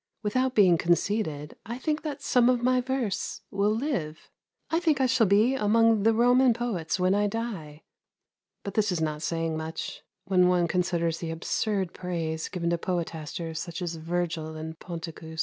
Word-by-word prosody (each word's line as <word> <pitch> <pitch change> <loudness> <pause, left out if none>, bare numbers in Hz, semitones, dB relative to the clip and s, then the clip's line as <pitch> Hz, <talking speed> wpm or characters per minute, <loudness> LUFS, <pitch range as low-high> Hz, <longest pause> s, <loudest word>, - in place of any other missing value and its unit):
Without 255 +5 0
being 180 -5 +5
conceited, 170 -4 0
I 235 +3 -5
think 305 +3 -1
that 295 -3 -5
some 245 -1 +4
of 245 -1 +2
my 255 0 +3
verse 245 -6 -2
will 200 +1 +1
live. 215 - -3 0.4
I 325 - +3
think 315 -5 +2
I 265 - +3
shall 255 -4 +3
be 210 +6 +4
among 225 -2 +3
the 225 +3 +4
Roman 245 +1 +5
poets 195 -8 -2
when 185 +1 +3
I 205 +1 +2
die; 195 -9 -5 0.8
but 200 - -5
this 210 -2 +2
is 175 - -1
not 155 -1 -2
saying 165 0 -1
much, 160 +1 -5 0.2
when 185 -2 +4
one 180 -1 +3
considers 170 -2 0
the 165 - -4
absurd 185 +3 -1
praise 165 -3 -3
given 170 -1 -2
to 170 - 0
poetasters 165 -2 -3
such 170 +1 -5
as 170 -2 -3
Virgil 165 -1 -3
and 160 +1 -7
Ponticus. 165 -2 -7
180 Hz, 170 wpm, -27 LUFS, 165-230 Hz, 0.8 s, being